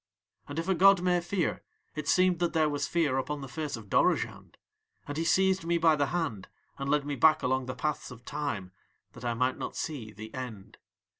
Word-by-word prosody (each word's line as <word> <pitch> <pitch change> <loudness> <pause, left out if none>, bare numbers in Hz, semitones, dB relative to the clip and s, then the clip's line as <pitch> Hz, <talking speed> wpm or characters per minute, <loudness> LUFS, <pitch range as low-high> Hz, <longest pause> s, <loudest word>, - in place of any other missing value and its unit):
"And 145 - -7
if 165 +2 -2
a 190 - +3
god 195 0 +6
may 180 -1 +2
fear, 175 -1 -1 0.3
it 155 -2 -5
seemed 185 0 +3
that 175 -1 0
there 160 -2 +3
was 145 - -1
fear 150 -6 +1
upon 145 +2 -3
the 135 - -6
face 150 0 -4
of 110 -2 -11
Dorozhand, - - 0 0.5
and 145 - -4
he 160 - -1
seized 190 +1 +3
me 170 +1 +1
by 160 -1 +4
the 145 -1 +1
hand 155 - -2 0.3
and 140 0 -3
led 145 0 +2
me 145 -1 -2
back 155 +4 +4
along 130 0 0
the 130 - -4
paths 150 0 -2
of 125 -1 -12
Time 140 -11 -3 0.4
that 125 - -12
I 120 -1 -1
might 125 +2 0
not - - -5
see 130 -9 -4
THE 110 +1 -10
END. 120 -7 -7
150 Hz, 215 wpm, -29 LUFS, 130-170 Hz, 0.5 s, god